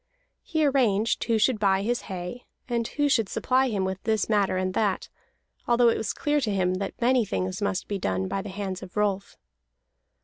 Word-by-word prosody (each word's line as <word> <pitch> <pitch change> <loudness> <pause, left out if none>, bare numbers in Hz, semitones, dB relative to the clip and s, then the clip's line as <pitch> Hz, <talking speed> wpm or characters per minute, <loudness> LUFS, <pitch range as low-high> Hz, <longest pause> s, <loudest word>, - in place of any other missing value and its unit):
He 315 -3 0
arranged 235 -6 +2
who 230 -2 +2
should 220 +1 +2
buy 195 -1 +2
his 240 +3 0
hay, 185 +6 -6 0.2
and 235 -2 -1
who 290 0 0
should 225 -7 +2
supply 260 +1 +1
him 200 -4 -1
with 190 0 -3
this 220 -2 0
matter 205 -3 +2
and 185 0 -1
that, 200 -2 0 0.6
although 240 0 +5
it - - +1
was 220 - -2
clear 295 0 0
that 195 -4 0
many 245 0 +3
things 185 -1 -3
must 200 -1 -1
be 200 -1 -3
done 95 - -1
by 195 - -2
the 205 - -7
hands 190 -1 -4
of 185 - -10
Rolf. 200 -2 -1
205 Hz, 190 wpm, -26 LUFS, 190-240 Hz, 0.6 s, although